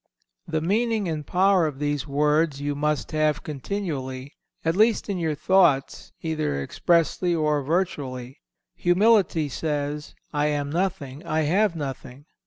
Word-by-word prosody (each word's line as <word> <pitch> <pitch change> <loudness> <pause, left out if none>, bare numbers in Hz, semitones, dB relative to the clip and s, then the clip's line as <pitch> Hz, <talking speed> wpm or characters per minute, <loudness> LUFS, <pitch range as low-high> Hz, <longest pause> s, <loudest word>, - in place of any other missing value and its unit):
The 155 - -1
meaning 215 +3 +1
and 155 -3 -4
power 185 -2 +3
of 145 -3 -5
these 145 -1 -2
words 150 +1 +1
you 145 0 -2
must 150 -2 -1
have 155 -1 +1
continually, 140 -4 -4 0.3
at 165 +1 +1
least 220 +1 +3
in 195 -3 -1
your 160 -3 -1
thoughts 155 -4 +2
either 155 - -1
expressly 170 - +1
or 150 -2 +1
virtually. 135 -5 -2 0.3
Humility 180 -3 +3
says, 150 +1 -3 0.2
"I 150 0 +1
am 145 -1 -1
nothing, 155 -5 -2
I 155 +1 0
have 180 +5 +2
nothing." 135 -2 -6
155 Hz, 135 wpm, -25 LUFS, 145-175 Hz, 0.3 s, power